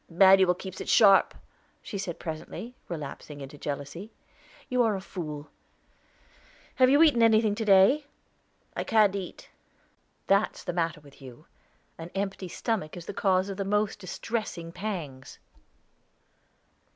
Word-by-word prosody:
"Manuel 190 +1 +6
keeps 190 +1 -8
it - - -6
sharp," 200 -4 +5 0.5
she 200 - -6
said 175 -3 -4
presently, 165 +9 -7 0.2
relapsing 150 -2 -7
into 135 +1 -9
jealousy. 145 +8 -6 0.6
"You 250 -1 +1
are 225 -3 +2
a - - -3
fool. 155 -6 -7 1.3
Have 255 -1 +5
you 285 +4 +6
eaten 290 -7 +4
anything 220 -2 +4
to 220 +1 -3
day?" 205 +9 +5 0.7
"I - - -2
can't 210 -3 +3
eat." 190 -2 -7 0.7
"That's 200 +2 +1
the 175 - -4
matter 165 -3 -1
with 140 -1 -18
you 125 -3 -12 0.5
an 165 +1 -7
empty 195 -1 -3
stomach 180 -3 -3
is 170 - -9
the - - -6
cause 190 -1 +1
of 195 0 -3
most 210 +1 0
distressing 185 -3 -5
pangs." 170 -9 -6
190 Hz, 135 wpm, -27 LUFS, 165-215 Hz, 1.3 s, Manuel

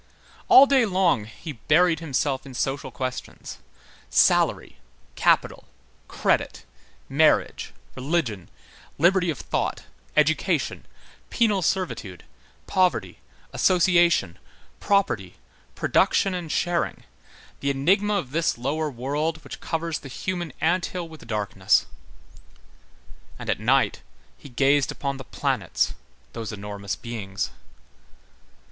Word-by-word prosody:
All 270 - +9
day 275 -2 +4
long, 185 - +2
he 150 +8 -9
buried 160 +6 +2
himself 140 -3 -1
in 135 -2 -11
social 135 +3 -2
questions, 130 -1 -6 0.5
salary, - - +2 0.3
capital, - - +1 0.4
credit, - - -1 0.4
marriage, 150 +3 +2 0.2
religion, 130 - -2 0.5
liberty 180 +3 +3
of 160 - -2
thought, - - -2 0.3
education, - - +1 0.4
penal 215 -5 +2
servitude, 165 - -2 0.4
poverty, 185 -1 0 0.3
association, 175 - +3 0.4
property, 150 - 0 0.4
production 195 - +2
and 175 -4 -4
sharing, 175 -1 -1 0.6
the 140 - -1
enigma 190 +10 +2
of 150 -10 -3
this 160 -2 0
lower 150 +5 -1
world 150 +5 -3
which 140 - -9
covers 165 -1 -2
the 135 - -10
human 175 +4 -4
ant 175 +3 +1
hill 180 -2 -5
with 160 -5 -13
darkness; 100 -4 +1 1.5
and - - -3
at - - -2
night, - - +2 0.3
he 145 - -13
gazed 140 +2 +2
upon 140 -1 -4
the 135 - -8
planets, - - -1 0.4
those 110 -2 -5
enormous 100 -1 -5
beings. 105 -5 -5
150 Hz, 105 wpm, -24 LUFS, 125-175 Hz, 1.5 s, All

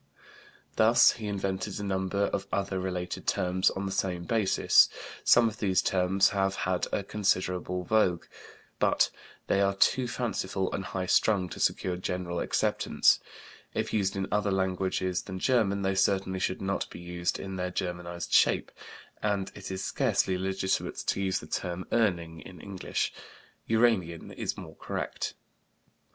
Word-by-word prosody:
He - - +1
also 120 +2 +6
invented 100 -1 -3
a - - -4
number 95 0 -1
of 100 - -2
other 95 -1 -1
related 90 -1 -4
terms 90 +1 +2
on 95 - -4
the 95 - -3
same 95 -2 -1
basis; 105 0 +4 0.3
some 120 -1 +6
of 110 0 -5
these 95 -3 +2
terms 95 +1 +3
have 95 -1 0
had 90 -1 -1
a 100 - -1
considerable 90 -3 -1
vogue, 90 -3 +2 0.5
but - - +3 0.3
they 100 - +2
are 100 0 +2
too 125 +5 +3
fanciful 95 -6 -2
and 95 - -3
high 90 +1 -3
strung 95 0 +2
to - - -8
secure 90 -1 0
general 90 -1 -3
acceptance. - - +2 0.6
If - - -2
used 100 -2 +1
in 95 -1 -2
other 105 0 +1
languages 95 -1 0
than 95 -1 -7
German 100 -3 +2
they 95 0 +1
certainly 95 -1 +1
should 95 +1 -2
not 95 0 -1
be - - -10
used 85 0 -2
in 95 -1 -5
their 90 0 -2
Germanized 90 -1 -4
shape, - - +4 0.5
and 100 -2 -1
it 100 - -8
is 95 0 -4
scarcely 95 - +1
legitimate 95 +1 -1
to - - -1
use 95 -1 +1
the - - -10
term 90 0 -3
"Urning" 85 -8 0
in 90 -3 -12
English. 95 +1 -3 0.5
"Uranian" 110 -8 +1
is - - -3
more - - -9
correct. - - -4
95 Hz, 155 wpm, -29 LUFS, 90-100 Hz, 0.6 s, also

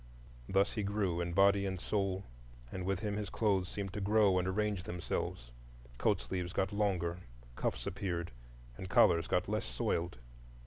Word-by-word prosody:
Thus 95 +1 +3
he 110 - -1
grew 100 -4 0
in 85 0 -2
body 100 +1 +5
and 95 -1 -3
soul, 100 -1 -1 0.5
and 90 -1 -4
with 95 0 0
him 105 -1 -1
his 105 -3 -3
clothes 95 -5 +1
seemed 100 -2 -4
to 105 - -3
grow 100 -2 +4
and 90 - -1
arrange 105 0 0
themselves; 85 - -4 0.5
coat 105 -4 +2
sleeves 90 -1 -3
got 95 +1 0
longer, 90 -4 0 0.4
cuffs - - -2
appeared, 85 -3 -3 0.5
and 95 - -6
collars 85 -3 +5
got 90 - +1
less 105 +1 -1
soiled. 85 +6 -1
95 Hz, 165 wpm, -34 LUFS, 90-100 Hz, 0.5 s, body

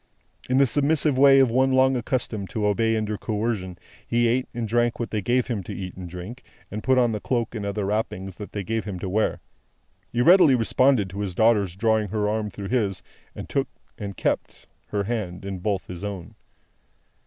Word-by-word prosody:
In 130 - +2
the 140 - +6
submissive 145 +2 +2
way 135 +1 +7
of 130 -3 +4
one 130 +2 +3
long 130 0 +4
accustomed 120 -5 -2
to 105 -2 -2
obey 115 +2 +2
under 105 -1 -2
coercion, 105 -5 -2 0.3
he 120 0 +2
ate 125 +2 +1
and 120 -2 -3
drank 120 +1 +1
what 120 - -3
they 110 - -1
gave 125 +4 +1
him 115 -5 -3
to - - -6
eat 95 -1 -6
and 90 -2 -8
drink, 90 +9 -8 0.3
and 105 +2 -4
put 130 +2 +2
on 120 -2 +3
the 105 - -2
cloak 120 +1 -1
and 105 -3 -4
other 100 0 -2
wrappings, 95 -3 -3
that 105 - -8
they 100 - -4
gave 115 +2 -2
him 100 -3 -5
to 90 - -5
wear. 105 +4 0 0.7
He 120 - 0
readily 170 -2 +7
responded 125 -1 +3
to 100 - -6
his 100 -4 -3
daughter's 105 -5 +3
drawing 110 +1 +1
her 105 +1 -1
arm 105 0 -1
through 100 -1 -7
his, 105 -7 0 0.3
and - - -7
took - - 0 0.3
and 100 -2 -7
kept - - -2 0.2
her 100 -1 -1
hand 100 -5 -4
in 95 -1 -4
both 100 0 -1
his 90 +1 -8
own. 100 -4 -6
110 Hz, 205 wpm, -24 LUFS, 100-120 Hz, 0.7 s, way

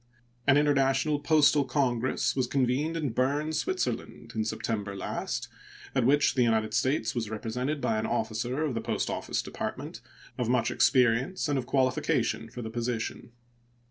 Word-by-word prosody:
An 140 0 +6
international 145 0 +2
postal 150 -1 +4
congress 130 -2 0
was 130 -2 +1
convened 135 +5 0
in 150 -6 -1
Berne, 140 +6 0
Switzerland, 375 - -2
in 110 - 0
September 110 -2 -3
last, 95 - -3 0.5
at 130 -3 +2
which 145 +1 +4
the 130 - +1
United 110 -2 +2
States 130 -3 +1
was 115 -4 -2
represented 125 +7 -3
by 110 -5 0
an - - -2
officer 120 +6 -1
of 150 -4 -1
the 115 - -2
Post - - -2
Office - - -2
Department - - -5 0.4
of 120 -2 0
much 120 -2 +2
experience 125 +8 +3
and 145 -2 +1
of 120 - -6
qualification 130 -3 +1
for 120 +1 -7
the 110 - -5
position. 120 0 -3
125 Hz, 155 wpm, -28 LUFS, 115-145 Hz, 0.5 s, An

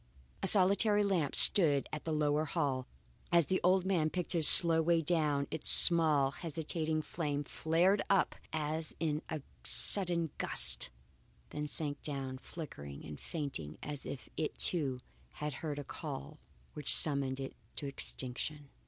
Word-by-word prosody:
A - - -2
solitary 205 +2 +2
lamp 180 -8 -3
stood 145 -8 +6
in 150 - -5
the 165 - -6
lower 150 0 -2
hall. 140 -5 -4 0.4
As 170 -2 +2
the 185 +4 -3
old 185 +1 +1
man 170 -5 -1
picked 180 0 -6
his 165 -4 +5
slow 165 -2 +7
way 170 +1 0
down, 150 -3 -1
its 160 -1 0
small, 155 -6 +6
hesitating 160 0 -5
flame 145 -4 -5
flared 175 +7 -1
up 195 -1 0 0.2
as 155 0 -3
in 155 -1 -3
a 155 -4 -7 0.2
sudden 170 -5 +4
gust, - - +4 0.6
then 150 0 -6
sank 145 0 -1
down 135 -3 -7
flickering 70 - -11
and 75 -1 -11
faint 145 - -6 0.2
as 145 -2 -8
if 135 - -10
it, 155 - -5
too, 135 -7 0 0.3
had 150 -1 -7
heard 150 -3 -6
a 145 - -7
call 70 - -10 0.3
which 150 -2 +3
summoned 140 -3 0
it 135 -1 -8 0.2
to 145 - -6
extinction. 140 +1 -4
155 Hz, 150 wpm, -31 LUFS, 145-170 Hz, 0.6 s, slow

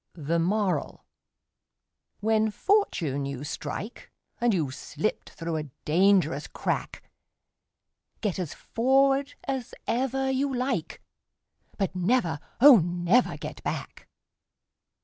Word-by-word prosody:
The 165 +1 -1
Moral: 185 -2 -1 1.2
When 220 0 +2
fortune 195 - +1
you 140 0 -5
strike, 210 - -6 0.3
And 240 0 +3
you've 155 -9 0
slipped 155 +10 -3
through 165 -1 -4
a 150 -1 -5 0.2
dangerous 170 -3 +3
crack, - - -3 1.2
Get 200 -4 -2
as 175 -5 -4
forward 270 +3 +2
as 265 -3 -3
ever 265 +3 0
you 270 +1 0
like, 255 +1 -2 0.7
But 195 -2 -1
never, 180 - +1 0.2
oh, 270 0 +10
never 175 +7 +2
get - - -7
back! - - -5
200 Hz, 105 wpm, -27 LUFS, 165-255 Hz, 1.2 s, oh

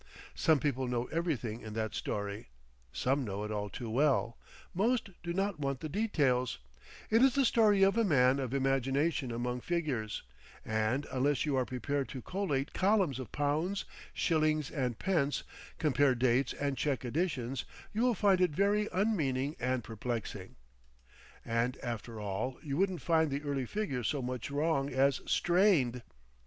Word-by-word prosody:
Some 160 -2 +3
people 135 -3 -1
know 120 -1 -1
everything 140 -9 -2
in 110 -1 -7
that 110 0 -2
story, 100 0 -4 0.4
some 135 +2 0
know 100 -2 -4
it 105 - -4
all 105 -1 -2
too 120 - -6
well, 125 -1 +2 0.4
most 225 +3 +1
do 170 - -4
not 195 -1 -1
want 135 -2 -2
the 155 - -4
details, 140 - +1 0.5
it 225 +2 +5
is 265 -1 +5
the 275 -1 +4
story 210 -4 +4
of 195 +1 +4
a - - +4
man 135 - +4
of 130 -3 -3
imagination 135 +1 +1
among 125 +1 -2
figures, 140 -11 -2 0.4
and 110 +6 0
unless 135 +3 +1
you 145 -3 0
are 130 -1 +1
prepared 135 +2 -2
to 130 - -6
collate 155 -8 -2
columns 190 - +2
of 125 -5 -7
pounds, 155 +7 0 0.3
shillings 155 -3 +1
and 125 -5 -2
pence, 150 -7 0 0.3
compare 145 -3 +3
dates 125 +1 +2
and 140 -2 -2
check 135 -3 -1
additions, 135 -3 -1 0.3
you 215 - 0
will 245 -1 +3
find 195 -2 +3
it 180 - +4
very 205 +6 +1
unmeaning 155 -8 0
and 125 -1 0
perplexing. 110 -4 -5 0.9
And 115 +2 0
after 115 -1 -5
all, 105 +5 -3
you 140 -3 -3
wouldn't 185 -2 0
find 160 -2 +3
the 140 +1 -3
early 140 -3 -2
figures 135 - -2
so 140 -4 -1
much 125 0 -4
wrong 145 -1 0
as 135 +1 +2
strained. 170 - +3
140 Hz, 160 wpm, -32 LUFS, 125-170 Hz, 0.9 s, it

